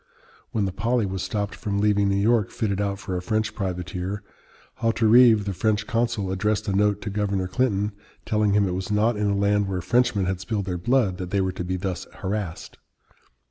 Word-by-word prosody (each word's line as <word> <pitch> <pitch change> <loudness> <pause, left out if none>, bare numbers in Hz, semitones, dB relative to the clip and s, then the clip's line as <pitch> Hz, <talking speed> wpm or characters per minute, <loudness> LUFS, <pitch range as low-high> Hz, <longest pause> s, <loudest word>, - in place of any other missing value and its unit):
When 105 -3 0
the 95 - -2
Polly 115 +4 0
was 95 -1 -3
stopped 105 -2 -2
from 100 -1 -3
leaving 100 -1 +3
New 100 - +1
York 105 +1 +2
fitted 100 -3 -1
out 100 -1 -1
for 100 -3 -5
a 90 - -2
French 110 +4 -1
privateer, 90 +1 -4 0.6
Hauterive, 115 -1 +5
the 100 - -2
French 105 +3 0
consul, 115 -4 -1
addressed 105 +3 0
a 100 - 0
note 105 0 +2
to 105 - -4
Governor 100 -2 -1
Clinton, 105 0 0 0.3
telling 105 -2 +1
him 100 -1 +3
it - - -2
was 95 +2 -4
not 110 +3 +2
in 105 0 0
a 100 - +1
land 100 0 +2
where 95 -1 -2
Frenchmen 105 0 +2
had 95 0 -1
spilled 100 0 -3
their 90 -2 -3
blood 115 -4 +1
that 90 -1 -4
they 100 - 0
were 95 -1 +1
to 90 - -5
be 90 +1 -2
thus 95 0 -4
harassed. 95 -3 -5
100 Hz, 205 wpm, -24 LUFS, 95-110 Hz, 0.6 s, Hauterive